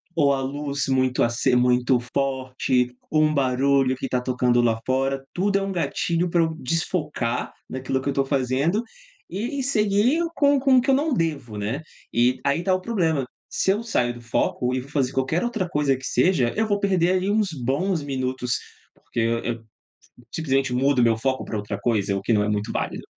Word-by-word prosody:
ou 140 Hz, -3 st, +4 dB
a 135 Hz, -, -1 dB
luz 140 Hz, +1 st, -3 dB
muito 130 Hz, -1 st, +2 dB
aces 120 Hz, +2 st, +1 dB
muito 125 Hz, 0 st, +3 dB
forte 130 Hz, -2 st, 0 dB
ou 155 Hz, 0 st, +3 dB
um 155 Hz, -, +2 dB
barulho 135 Hz, -1 st, +2 dB
que 130 Hz, -, -4 dB
tá 125 Hz, -1 st, -1 dB
tocando 125 Hz, -1 st, +2 dB
lá 115 Hz, -2 st, +1 dB
fora. 135 Hz, +1 st, 0 dB
Tudo 200 Hz, +2 st, +1 dB
é -, -, -4 dB
um 195 Hz, -, -3 dB
gatilho 170 Hz, -1 st, -1 dB
pra 170 Hz, 0 st, +2 dB
eu 160 Hz, -1 st, +1 dB
desfocar 150 Hz, -5 st, -2 dB, 0.2 s
naquilo 130 Hz, 0 st, -2 dB
que 140 Hz, -, -2 dB
eu -, -, 0 dB
tô 135 Hz, 0 st, +1 dB
fazendo 140 Hz, -, 0 dB, 0.5 s
e 240 Hz, -, -3 dB
e -, -, -1 dB
seguir 215 Hz, +2 st, +2 dB, 0.2 s
com 285 Hz, -1 st, +4 dB
com 265 Hz, -1 st, +4 dB
o -, -, +6 dB
que 260 Hz, -, -3 dB
eu -, -, +5 dB
não 295 Hz, +2 st, +1 dB
devo, 150 Hz, -, -2 dB
né. 110 Hz, +8 st, -3 dB, 0.3 s
E, 120 Hz, +2 st, +2 dB
aí 140 Hz, +5 st, +1 dB
tá 190 Hz, -, +2 dB
o 185 Hz, -, 0 dB
problema, 165 Hz, -, 0 dB, 0.2 s
se 190 Hz, -, +1 dB
eu 210 Hz, +4 st, -1 dB
saio 125 Hz, -, 0 dB
do 120 Hz, -, -11 dB
foco 125 Hz, +2 st, -1 dB
e -, -, 0 dB
vou 135 Hz, -, -13 dB
fazer 135 Hz, -3 st, 0 dB
qualquer 135 Hz, -, 0 dB
outra 225 Hz, -6 st, -1 dB
coisa 145 Hz, -4 st, +1 dB
que 130 Hz, -, -10 dB
seja, 140 Hz, -10 st, +2 dB
eu 220 Hz, 0 st, +1 dB
vou 205 Hz, -1 st, +1 dB
perder 185 Hz, -3 st, +2 dB
ali 185 Hz, +1 st, 0 dB
uns 215 Hz, -2 st, +2 dB
bons 150 Hz, +6 st, -1 dB
minutos, 130 Hz, -3 st, -2 dB, 0.4 s
porque, 115 Hz, -, -5 dB
e 115 Hz, +1 st, 0 dB
eu 115 Hz, -1 st, -4 dB, 0.7 s
simplesmente 135 Hz, -4 st, 0 dB
mudo 135 Hz, +1 st, +2 dB
o -, -, +5 dB
meu 115 Hz, -1 st, +3 dB
foco 130 Hz, +3 st, -1 dB
pra 110 Hz, -, -4 dB
outra 105 Hz, -1 st, -4 dB
coisa, 100 Hz, -3 st, 0 dB
o 95 Hz, -, -2 dB
que 115 Hz, -, +1 dB
não 105 Hz, -1 st, +3 dB
é 105 Hz, -, -1 dB
muito 105 Hz, 0 st, -1 dB
válido. -, -, -3 dB
135 Hz, 205 wpm, -24 LUFS, 125-175 Hz, 0.7 s, o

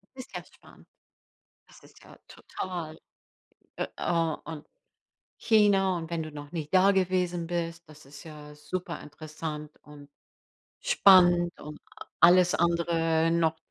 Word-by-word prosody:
Ist 255 Hz, -1 st, -11 dB
ja -, -, -5 dB
spannend. -, -, -20 dB, 0.8 s
Das -, -, -18 dB
ist -, -, -19 dB
ja -, -, -16 dB
total 170 Hz, -4 st, -7 dB, 0.8 s
äh, -, -, -2 dB
oh, 165 Hz, -2 st, 0 dB
und 155 Hz, -2 st, -8 dB, 0.7 s
China 200 Hz, -4 st, +3 dB
und 165 Hz, -1 st, -6 dB
wenn 165 Hz, -1 st, -2 dB
du 155 Hz, -, -7 dB
noch 145 Hz, 0 st, -10 dB
nicht 155 Hz, -2 st, -6 dB
da 190 Hz, +1 st, +6 dB
gewesen 180 Hz, -2 st, 0 dB
bist, 170 Hz, -1 st, -4 dB
das 150 Hz, 0 st, -16 dB
ist 140 Hz, +1 st, -13 dB
ja 150 Hz, -2 st, -11 dB
superinteressant 155 Hz, -1 st, -7 dB
und 145 Hz, -1 st, -15 dB, 0.7 s
spannend 185 Hz, -, +4 dB
und 150 Hz, 0 st, -9 dB, 0.4 s
alles 180 Hz, +1 st, +6 dB
andere 165 Hz, -1 st, +1 dB
noch 165 Hz, -1 st, +1 dB
165 Hz, 125 wpm, -27 LUFS, 155-180 Hz, 0.8 s, da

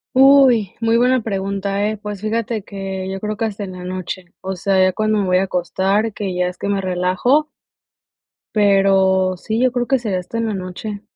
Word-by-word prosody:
Uy, 265 Hz, -7 st, +6 dB
muy 230 Hz, 0 st, +3 dB
buena 250 Hz, +1 st, +3 dB
pregunta, 200 Hz, -1 st, -2 dB
eh. 215 Hz, -, -3 dB
Pues, 210 Hz, -1 st, -7 dB
fíjate 225 Hz, 0 st, -2 dB
que 195 Hz, -1 st, -5 dB
yo 195 Hz, -, -4 dB
creo 210 Hz, +1 st, -4 dB
que 225 Hz, -, -1 dB
hasta 210 Hz, -1 st, -4 dB
en 185 Hz, -, -8 dB
la 180 Hz, 0 st, -9 dB
noche, 185 Hz, -1 st, -6 dB
o 190 Hz, 0 st, -4 dB
sea, 190 Hz, +1 st, +1 dB
ya 185 Hz, -, +4 dB
cuando 215 Hz, +1 st, +1 dB
me 200 Hz, -, 0 dB
voy 185 Hz, 0 st, +3 dB
a 190 Hz, -, +2 dB
acostar, 195 Hz, +4 st, 0 dB
que 195 Hz, -3 st, -4 dB
ya 180 Hz, 0 st, 0 dB
es 180 Hz, -, -6 dB
que -, -, -4 dB
me 200 Hz, -1 st, 0 dB
relajo 185 Hz, +11 st, +1 dB, 1.1 s
pero 195 Hz, -2 st, +3 dB
sí, 220 Hz, +5 st, -3 dB
yo 255 Hz, -1 st, +3 dB
creo 245 Hz, -1 st, -1 dB
que 270 Hz, -2 st, +2 dB
sería 205 Hz, -6 st, -2 dB
hasta 180 Hz, +6 st, -6 dB
en 230 Hz, -, 0 dB
la 215 Hz, -, -2 dB
noche. 195 Hz, +3 st, -6 dB
200 Hz, 210 wpm, -19 LUFS, 185-220 Hz, 1.1 s, Uy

